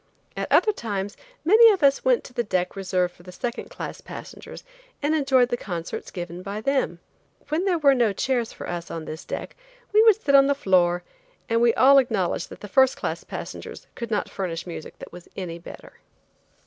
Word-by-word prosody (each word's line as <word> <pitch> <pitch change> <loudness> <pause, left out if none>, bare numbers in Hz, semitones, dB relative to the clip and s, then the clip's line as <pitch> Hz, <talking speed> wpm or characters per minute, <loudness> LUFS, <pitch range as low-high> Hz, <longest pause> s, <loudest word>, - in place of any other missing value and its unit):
At - - -4
other 430 - +5
times 205 - -4 0.3
many 445 +6 +8
of 385 -7 -1
us 275 0 +4
went - - +3
to - - -12
the 245 - 0
deck 185 -4 -1
reserved 185 -2 -1
for - - -19
the 180 +1 -11
second 235 +6 -5
class - - -7
passengers - - -10 0.4
and 295 +2 0
enjoyed 270 -5 +3
the 240 - -1
concerts 175 -6 -5
given 175 -1 -6
by 200 +2 -5
them. 265 -7 0 0.5
When 320 +5 0
there 365 -3 +2
were 285 -3 +5
no 240 -5 +2
chairs 240 +3 -1
for - - -8
us 175 -1 -5
on 165 -1 -5
this 155 +1 -7
deck - - -6 0.4
we 425 - +7
would 445 -2 +6
sit 285 -10 0
on 275 0 +7
the 280 - +2
floor, 180 -6 +2 0.4
and 230 0 +1
we 235 -1 +4
all 275 +2 +7
acknowledged 205 -9 -1
that - - -12
the 210 - -7
first 265 +5 +4
class - - -3
passengers - - -8
could 235 -2 -6
not 210 -2 -1
furnish 175 -4 -4
music 170 -3 -8
that - - -11
was 175 -1 -11
any 170 -3 -5
better. 170 - -12
230 Hz, 200 wpm, -24 LUFS, 180-275 Hz, 0.5 s, many